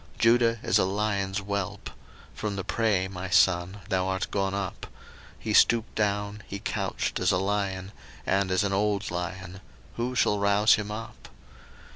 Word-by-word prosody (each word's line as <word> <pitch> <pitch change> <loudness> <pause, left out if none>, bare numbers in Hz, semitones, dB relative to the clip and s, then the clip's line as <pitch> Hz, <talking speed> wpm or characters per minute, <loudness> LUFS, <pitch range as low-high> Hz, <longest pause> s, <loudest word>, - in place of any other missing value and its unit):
01:049:009 - - -21
Judah 115 0 +4
is 95 - +3
a - - +4
lion's 100 0 -1
whelp: 100 -1 -4 0.4
from 105 -2 -3
the 100 - -3
prey, 105 -5 +1
my 95 0 -6
son, 95 +1 +3
thou 95 0 +1
art 95 0 -2
gone 95 -1 0
up: 100 -2 -4 0.5
he 110 - -3
stooped 115 +1 +4
down, 105 0 -1
he 100 - -5
couched - - -2
as 90 +1 +2
a - - +2
lion, 95 -1 -2 0.3
and 95 0 +1
as 95 +2 +2
an 100 -1 0
old 100 -1 0
lion; 90 +1 -5 0.4
who 125 +2 -2
shall 105 -4 +2
rouse 100 +2 +4
him 105 -1 -1
up? 110 +2 -8
100 Hz, 165 wpm, -27 LUFS, 95-105 Hz, 0.5 s, Judah